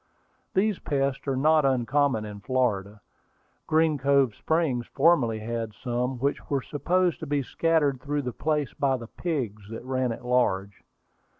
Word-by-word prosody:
These 200 0 +2
pests 135 -1 -1
are 135 - +1
not 155 +3 +4
uncommon 130 -2 +1
in 105 -1 -8
Florida. 105 -5 -1 0.7
Green 155 -2 +2
Cove 140 -3 +3
Springs 140 -5 0
formerly 135 -7 +3
had 115 -1 -4
some, 125 +1 -2
which 140 +4 -2
were 140 -2 0
supposed 175 +1 0
to 160 - -6
be 145 -1 0
scattered 145 -3 +1
through 145 0 -2
the 125 -1 -4
place 150 -7 -1
by 135 +2 +1
the 120 - -8
pigs 115 - -4
that 115 +2 -7
ran 130 -1 0
at 115 - -7
large. 100 -6 0
135 Hz, 155 wpm, -26 LUFS, 120-145 Hz, 0.7 s, not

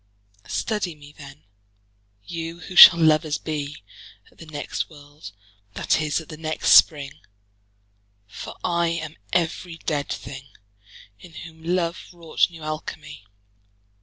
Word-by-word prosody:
Study 210 -7 -2
me 145 -1 -15
then, 145 0 -13 0.8
you 165 - -6
who 185 - -9
shall 170 - +11
lovers 155 -2 +3
bee 150 -5 -5 0.5
At - - -27
the 165 - -11
next 145 -2 -4
world, 145 -5 -13 0.4
that - - +1
is, 150 0 0
at 160 - -11
the 155 - -9
next 155 0 -1
Spring: 145 -1 +5 1.1
For 100 - -9
I 170 0 +1
am 160 -2 -4 0.2
every 170 0 -1
dead 145 -3 -3
thing, 135 0 -7 0.7
In 175 - -15
whom 160 -1 -11
love 170 0 -1
wrought 170 -1 0
new 165 -2 -12
Alchimie. 150 -5 -7
155 Hz, 130 wpm, -23 LUFS, 145-170 Hz, 1.1 s, shall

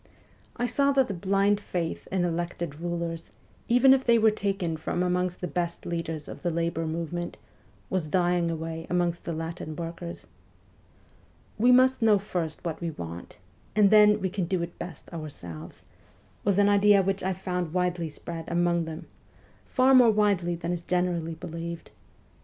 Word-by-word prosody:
I 245 - 0
saw 280 +4 +2
that 270 -3 +3
the - - -1
blind 195 +2 +2
faith 175 -5 -4
in 185 -2 +1
elected 170 -2 -3
rulers, 170 -1 -4 0.4
even 250 +3 +6
if 265 -1 +2
they 235 -2 +5
were 220 -1 +5
taken 195 -5 -1
from 160 +3 -2
amongst 180 0 -1
the 180 - -2
best 170 +2 -3
leaders 165 -3 -4
of - - -9
the 175 - 0
labour 165 -1 -1
movement, 170 +2 -4 0.5
was 185 -5 -1
dying 175 0 +2
away 165 0 -4
amongst 175 -1 0
the - - -2
Latin 160 -1 -5
workers. 170 +1 -6 1.3
'We 245 +3 +6
must 255 0 +5
know 220 -2 +5
first 180 -5 -4
what 165 -1 -3
we 170 - -1
want, 85 - -8 0.4
and 205 -2 +5
then 210 0 +7
we 190 -2 -2
can 185 -2 -1
do 175 0 -1
it 170 0 -8
best 170 -5 -8
our 155 -2 -5
selves,' 85 - -10 0.6
was 200 -2 +2
an 205 0 +5
idea 205 -1 +5
which 195 +1 0
I 190 +1 0
found 180 -2 -3
widely 180 -2 -1
spread 165 +2 -7
among 170 -1 +1
them 160 +1 -7 0.6
far 260 +1 +4
more 250 -3 +8
widely 200 -5 +2
than 170 +1 -4
is 175 - -4
generally 175 -2 -1
believed. 170 0 -7
175 Hz, 170 wpm, -27 LUFS, 165-200 Hz, 1.3 s, more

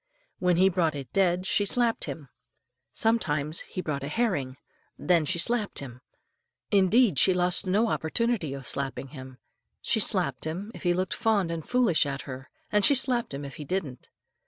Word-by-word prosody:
When 180 -1 +2
he 190 +2 +5
brought 170 -4 +1
it 135 -4 -8
dead, 185 -1 +2
she 205 - +2
slapped 230 +3 +1
him. 145 -5 -7 0.6
Sometimes 155 -9 0
he 185 - -6
brought 140 -3 -3
a - - -3
herring, 145 - -1 0.4
then 170 -3 +2
she 175 +4 0
slapped 220 +3 0
him. 130 -2 -8 0.7
Indeed, 200 - +4
she 185 - +4
lost 180 +2 +1
no 210 +5 +2
opportunity 190 - -1
of 135 -1 -9
slapping 135 0 -4
him. 130 -3 -11 0.4
She 225 - 0
slapped 175 - +1
him 185 +7 -5
if - - -10
he 175 -1 +1
looked 185 0 -1
fond 215 -7 +1
and 165 -1 -4
foolish 230 - +2
at 140 0 -4
her, 130 -1 -9 0.2
and 210 -1 +2
she 285 - +6
slapped 250 -2 +1
him 140 +1 -6
if 140 - -9
he 150 - -6
didn't. 145 -5 -4
175 Hz, 180 wpm, -27 LUFS, 140-205 Hz, 0.7 s, she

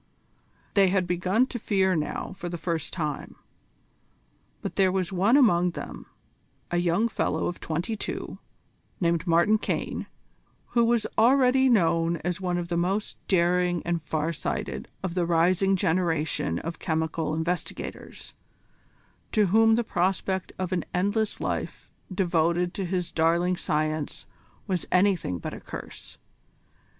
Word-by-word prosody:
They 195 -2 +5
had 185 0 +2
begun 180 +7 +2
to 255 -2 -6
fear 190 -3 +2
now 155 +4 -3
for 175 -2 -5
the 170 - -4
first 165 -2 -2
time. 150 -5 -4 1.3
But - - -4
there 190 -1 +4
was 190 0 -1
one 200 +8 +4
among 180 -10 +4
them, - - -7 0.6
a 175 - +1
young 175 +6 +2
fellow 225 - -1
of 175 - -3
twenty 170 +7 -2
two, - - -5 0.6
named 170 -1 +1
Martin 170 +6 +4
Caine, - - -3 0.6
who 235 -1 +3
was 230 -1 +2
already 260 +2 +5
known 170 -6 +3
as 180 +1 -2
one 180 -1 0
of 175 -1 -4
the 170 - 0
most 190 +5 -1
daring 180 -1 +2
and 170 -1 0
far 155 +1 -2
sighted 65 - -4 0.2
of 185 -3 -2
the 175 -2 0
rising 180 +3 +3
generation 160 -5 0
of 165 0 -5
chemical 160 -1 -1
investigators, 170 +3 -4 1.0
to 210 -1 +4
whom 225 0 +6
the 235 - +1
prospect 190 -1 -1
of 185 -1 -3
an 180 -2 0
endless 205 +4 0
life - - -4 0.2
devoted 175 -1 +1
to 195 - -3
his 180 -1 -2
darling 170 +3 +2
science 155 -2 -2 0.4
was 185 -5 -2
anything 180 - +2
but - - -6
a - - -7
curse. - - -9
180 Hz, 140 wpm, -26 LUFS, 170-195 Hz, 1.3 s, whom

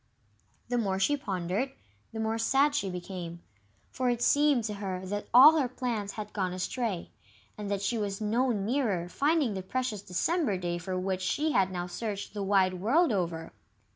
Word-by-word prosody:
The 245 -1 +1
more 195 -4 0
she 245 +10 +2
pondered, 195 +2 -2 0.4
the 225 - -6
more 220 +1 -1
sad 275 +5 +3
she 205 -10 0
became, 175 -1 -6 0.5
for 255 -1 0
it 240 -1 0
seemed 285 -4 +4
to 215 -1 -3
her 190 -2 -4
that 205 +2 -4
all 300 +6 +9
her 265 - +1
plans 235 -5 -3
had 210 -1 -7
gone 185 -3 -1
astray, 190 +1 -3 0.4
and 210 -1 -6
that 200 -1 -1
she 225 +3 0
was 200 -2 -2
no 230 +5 +1
nearer 210 -4 0
finding 285 - +1
the 190 - -3
precious 230 +1 -3
December 215 - 0
day 175 -1 -2
for 185 +1 -3
which 185 0 -2
she 295 +12 0
had 190 -8 +3
now 175 -1 -3
searched 200 +2 -5
the 205 - -4
wide 190 -1 +3
world 275 - +3
over. 170 -5 -2
205 Hz, 180 wpm, -29 LUFS, 185-250 Hz, 0.5 s, all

